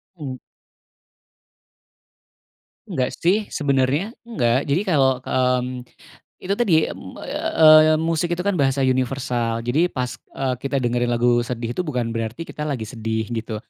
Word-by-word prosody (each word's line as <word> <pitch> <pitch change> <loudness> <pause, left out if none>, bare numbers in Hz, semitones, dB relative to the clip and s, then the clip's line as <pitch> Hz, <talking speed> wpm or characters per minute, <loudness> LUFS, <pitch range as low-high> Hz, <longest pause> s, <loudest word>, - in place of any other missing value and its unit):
Mmm. 135 -5 -6 2.5
Enggak 125 -1 -1
sih, 200 +5 +2
sebenernya, 145 - 0
enggak. 135 - +1
Jadi 145 +7 0
kalau, 135 -6 +3
mmm, 125 -1 0 0.6
itu 195 +2 0
tadi, 165 -9 +3
mmm, - - -10
eee, 155 0 +5
musik 165 +2 0
itu 180 - -4
kan 200 -5 0
bahasa 135 0 +2
universal. 125 -3 0
Jadi 150 +9 +2
pas, 125 -6 -4 0.2
eee, 130 -2 -1
kita 135 -1 -2
dengerin 120 0 0
lagu 120 0 +2
sedih 120 -1 -3
itu - - -6
bukan 120 -5 -2
berarti 115 +7 -4
kita 150 -2 -6
lagi 130 -6 -2
sedih, 110 0 -3
gitu. 110 -1 -4
130 Hz, 135 wpm, -22 LUFS, 120-155 Hz, 2.5 s, eee